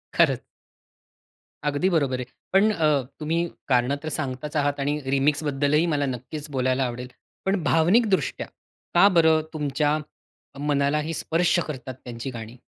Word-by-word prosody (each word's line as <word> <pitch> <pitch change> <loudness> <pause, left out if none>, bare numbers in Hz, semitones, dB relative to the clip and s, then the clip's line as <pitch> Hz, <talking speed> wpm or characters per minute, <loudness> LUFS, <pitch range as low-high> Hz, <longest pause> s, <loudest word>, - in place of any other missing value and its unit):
खरंच. - - +3 1.2
अगदी 145 +6 +1
बरोबर 140 -7 +1
आहे. 125 - -4 0.3
पण 210 +3 +5
अ, 155 -6 +2 0.2
तुम्ही 160 +2 0 0.3
कारणं 125 +1 +2
तर 155 - -3
सांगताच 140 +1 -4
आहात 145 0 0
आणि 145 +2 0
रिमिक्सबद्दलही 145 +2 +2
मला 145 -1 +1
नक्कीच 140 +4 -5
बोलायला 130 0 +1
आवडेल. 125 +1 -5 0.4
पण 190 -3 +1
भावनिकदृष्ट्या 190 +5 +2 0.5
का 200 - +7
बरं 160 -1 +5
तुमच्या 150 0 0 0.6
मनालाही 150 +2 0
स्पर्श 170 +3 +1
करतात 130 -3 -6
त्यांची 120 +2 -5
गाणी? 115 +1 -8
145 Hz, 125 wpm, -25 LUFS, 135-160 Hz, 1.2 s, का